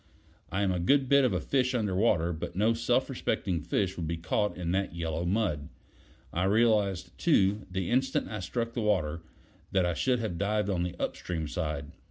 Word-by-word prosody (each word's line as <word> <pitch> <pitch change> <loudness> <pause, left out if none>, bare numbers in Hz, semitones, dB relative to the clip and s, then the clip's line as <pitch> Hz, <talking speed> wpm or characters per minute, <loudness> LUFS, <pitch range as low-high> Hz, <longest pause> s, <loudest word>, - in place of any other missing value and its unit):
I 95 +2 0
am 95 - +2
a 90 - -1
good 135 +10 +3
bit 140 +1 +5
of 125 - +2
a 95 - 0
fish 130 -2 +1
under 105 -5 0
water, 85 -5 +2
but 80 - -6
no 110 +4 +3
self 115 0 +1
respecting 85 -4 -1
fish 95 +4 -1
would 85 -2 -3
be 85 +1 -2
caught 105 +5 -1
in 85 -1 -2
that 95 -1 -1
yellow 85 0 -2
mud. 85 -7 0 0.6
I 90 +2 +1
realized, 105 -3 +2
too, 105 - +2
the 95 -1 -2
instant 130 +2 +1
I 105 - -5
struck 115 +5 -3
the 120 - -2
water, 85 -7 0 0.5
that 95 -2 +3
I 85 - +1
should 125 +7 +1
have 110 -7 -3
dived 105 0 +1
on 90 -3 0
the 90 0 -2
upstream 80 -3 -3
side. 75 -3 -3
95 Hz, 200 wpm, -29 LUFS, 85-110 Hz, 0.6 s, bit